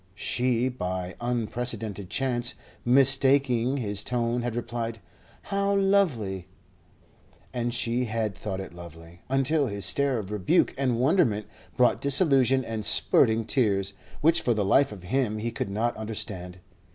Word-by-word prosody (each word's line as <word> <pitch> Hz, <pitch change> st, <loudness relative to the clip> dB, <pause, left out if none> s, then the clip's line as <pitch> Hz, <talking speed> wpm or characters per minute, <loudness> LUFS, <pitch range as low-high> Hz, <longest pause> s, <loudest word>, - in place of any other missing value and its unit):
She, 125 Hz, +4 st, 0 dB
by 90 Hz, -7 st, -4 dB
unprecedented 115 Hz, -4 st, -2 dB
chance, 125 Hz, -3 st, -1 dB, 0.3 s
mistaking 135 Hz, 0 st, +3 dB
his 105 Hz, -5 st, -2 dB
tone, 120 Hz, 0 st, -1 dB
had 120 Hz, -1 st, -3 dB
replied: 115 Hz, -1 st, -4 dB, 0.5 s
"How 200 Hz, 0 st, 0 dB
lovely!" 145 Hz, -, +1 dB, 1.1 s
And 120 Hz, -1 st, -2 dB
she 120 Hz, +1 st, 0 dB
had 110 Hz, -3 st, -2 dB
thought 95 Hz, +1 st, -5 dB
it 95 Hz, -3 st, -8 dB
lovely, 85 Hz, 0 st, -13 dB
until 135 Hz, +2 st, +1 dB
his 100 Hz, -2 st, -2 dB
stare 140 Hz, -2 st, +2 dB
of 105 Hz, -2 st, -6 dB
rebuke 105 Hz, -4 st, +1 dB
and 125 Hz, -4 st, -1 dB
wonderment 120 Hz, -, +2 dB, 0.3 s
brought 125 Hz, -1 st, +3 dB
disillusion 135 Hz, -4 st, +4 dB
and 110 Hz, -1 st, -4 dB
spurting 110 Hz, +1 st, +3 dB
tears, 100 Hz, -6 st, +1 dB, 0.3 s
which 165 Hz, +2 st, +4 dB
for 120 Hz, -, +1 dB
the 105 Hz, -2 st, 0 dB
life 135 Hz, +7 st, +3 dB
of 100 Hz, -4 st, -10 dB
him 110 Hz, +2 st, -1 dB
he 115 Hz, +2 st, -3 dB
could -, -, -4 dB
not 110 Hz, +4 st, -1 dB
understand. 95 Hz, -5 st, -6 dB
120 Hz, 140 wpm, -26 LUFS, 105-130 Hz, 1.1 s, disillusion